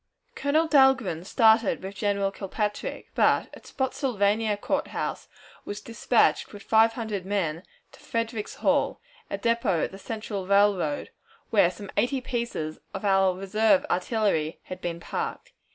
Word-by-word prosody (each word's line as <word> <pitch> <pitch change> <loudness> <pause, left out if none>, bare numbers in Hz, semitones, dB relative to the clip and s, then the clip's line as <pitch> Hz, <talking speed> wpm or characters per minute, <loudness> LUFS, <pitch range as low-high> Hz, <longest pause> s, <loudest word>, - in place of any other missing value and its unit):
Colonel 310 +3 +1
Dahlgren 265 - +4
started 220 -2 +3
with 190 +1 -6
General 200 0 0
Kilpatrick, 205 +2 -4
but - - +3
at - - -13
Spottsylvania 220 -5 0
Court - - -1
House - - -4 0.4
was 205 - -6
dispatched 235 +1 +1
with 205 -1 -11
five 225 +1 +4
hundred 220 -5 -4
men 180 -5 -1 0.3
to - - -17
Frederickhall, 230 -2 -1 0.3
a - - -2
depot 230 -5 +1
of - - -2
the 195 - -10
Central 210 -3 -5
Railroad, 200 +6 +2 0.4
where 200 -6 +5
some 200 +2 -9
eighty 245 +6 +2
pieces 235 -11 -4 0.2
of 195 - -5
our 195 -2 +3
reserve 200 +1 +2
artillery 180 -5 0
had 185 - -8
been 170 -1 -3
parked. - - -5
205 Hz, 135 wpm, -26 LUFS, 195-230 Hz, 0.4 s, where